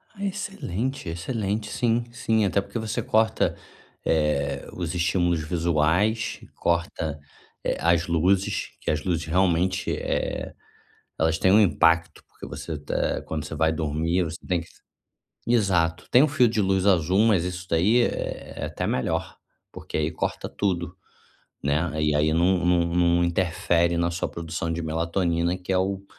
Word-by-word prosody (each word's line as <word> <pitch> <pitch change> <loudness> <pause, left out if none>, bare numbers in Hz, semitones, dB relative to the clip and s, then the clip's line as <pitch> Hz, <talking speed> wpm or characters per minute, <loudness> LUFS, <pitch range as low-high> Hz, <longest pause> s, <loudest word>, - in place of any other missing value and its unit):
Ah 200 - -7
excelente, 140 - -3
excelente, 105 +4 -3
sim, 120 -1 +1
sim. 110 -3 +1
Até 100 +1 +1
porque 115 - -6
você 110 0 -2
corta, 110 +1 +1 0.5
eh, 70 -3 0
os 85 -3 -4
estímulos 85 -1 +1
visuais, 85 +7 +1 0.2
corta, 85 -3 -1 0.4
eh, - - -1
as 85 0 +2
luzes, 90 +4 +1
que - - -3
as 75 0 0
luzes 85 -3 -1
realmente, 90 +2 +1
eh, - - -2 0.7
elas 80 0 +2
têm 95 - +4
um 105 - +7
impacto 85 -4 +3
porque - - -12
você 80 -2 -6
tá 75 - -2
quando 80 -1 -4
você 75 - -6
vai 80 +1 +2
dormir 80 +3 0
você 80 -1 -5
tem 90 -2 0
que 85 - -12 0.8
Exato, 95 -8 +1
tem 125 - +6
um 155 - +4
fio 130 -4 +4
de 110 -1 0
luz 95 -1 +1
azul 90 -1 +3
mas 100 -7 +3
isso 90 0 -5
daí 100 +9 +3
é - - -3
é - - -2
até - - -3
melhor, 65 - -1 0.4
porque - - -6
aí 80 +1 0
corta 80 - -3
tudo, 90 -3 -2 0.7
né, 80 +2 0
e 75 -1 +2
aí 75 +1 +2
num 90 +2 +2
num 85 -1 +2
num 85 0 +3
interfere 85 -1 +1
na 85 0 +1
sua 85 +1 -2
produção 85 0 -4
de 85 +1 -3
melatonina 85 +2 0
que 90 +1 -4
é 95 - +3
o 95 +1 -1
85 Hz, 160 wpm, -25 LUFS, 80-95 Hz, 0.8 s, um